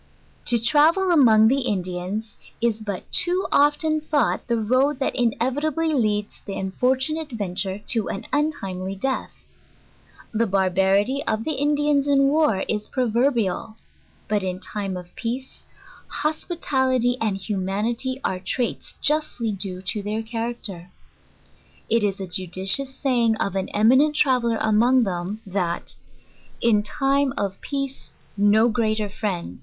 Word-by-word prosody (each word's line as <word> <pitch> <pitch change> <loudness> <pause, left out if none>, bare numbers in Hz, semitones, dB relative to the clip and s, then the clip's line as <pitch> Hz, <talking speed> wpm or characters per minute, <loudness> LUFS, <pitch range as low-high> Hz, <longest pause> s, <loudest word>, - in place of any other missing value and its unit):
To 240 - +4
travel 310 - +4
among 225 -9 +6
the 270 +4 +3
Indians, 195 -1 -3 0.2
is 225 -2 0
but 200 -4 -4 0.2
to 365 +1 0
often 300 +2 +3
thought 300 -4 0
the 235 -1 +1
road 255 +6 +2
that 270 - -1
inevitably 285 +7 0
leads 210 -5 -1
the 195 - -4
unfortunate 260 +10 0
adventurer 195 -3 -2
to 225 -4 +1
an 195 - -5
untimely 195 -11 -2
death. 265 +7 -3 0.9
The 230 +1 +1
barbarity 195 +6 +2
oj'the 225 +8 0
Indians 290 0 +2
in 275 -1 +4
war 295 -10 +2
is 210 -1 -2
pro 255 -2 -1
verbial; 230 -4 0 0.5
but 210 -1 +1
in^time 190 +1 -4
of 175 0 -14
peace, 245 +3 -5 0.4
hospitality 265 -6 0
and 210 -3 0
humanity 210 +6 -2
are 185 - -1
traits 235 +6 -3
justly 300 -7 0
due 190 -2 -4
to 205 +3 -2
their 210 +2 -3
character. 225 -6 -5 1.0
It 230 -1 +3
is 200 -1 0
a 190 - -4
judicious 190 +9 0
saying 240 -5 +2
of 200 -3 -2
an 190 -1 -2
eminent 260 +8 +4
traveller 250 -6 +2
arptngthem, 215 -4 +1
that, 180 -3 -2 0.6
"in 220 -3 +3
time 275 +3 +1
of 195 -4 -2
peace 275 -1 -4 0.2
no 205 +3 +4
greater 215 -2 0
friend? 190 - -4
225 Hz, 130 wpm, -23 LUFS, 200-270 Hz, 1.0 s, among